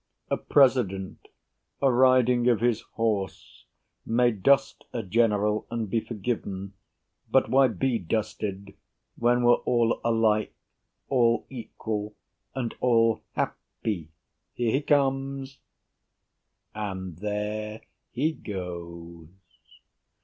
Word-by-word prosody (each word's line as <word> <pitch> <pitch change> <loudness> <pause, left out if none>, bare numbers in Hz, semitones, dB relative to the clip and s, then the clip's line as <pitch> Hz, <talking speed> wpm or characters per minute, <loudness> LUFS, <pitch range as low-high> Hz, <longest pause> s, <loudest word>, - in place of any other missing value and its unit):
A - - +2
President, 120 -9 +2 0.5
a 135 -1 +3
riding 125 -1 +4
of 120 -4 +3
his 120 -1 +1
horse, 110 -5 -2 0.4
May 120 +1 +3
dust 135 +6 +2
a 115 - -3
General 105 0 +1
and 115 -4 -3
be 115 - +2
forgiven; 100 -4 -4 0.6
But - - +3
why 135 0 +6
be 115 +2 0
dusted 100 0 -3 0.4
when 120 +1 +2
we're 120 0 +6
all 120 -1 +1
alike, 110 -2 +2 0.5
All 120 -4 +2
equal, 110 -3 -5 0.4
and 125 -3 -2
all 115 -2 +3
happy. 90 -8 -4 0.5
Here 120 -2 0
he 135 - +1
comes 135 -2 0 1.1
And 95 -5 -5
there 105 +2 -3 0.3
he 145 +6 0
goes. 85 - -7
115 Hz, 100 wpm, -27 LUFS, 105-125 Hz, 1.1 s, why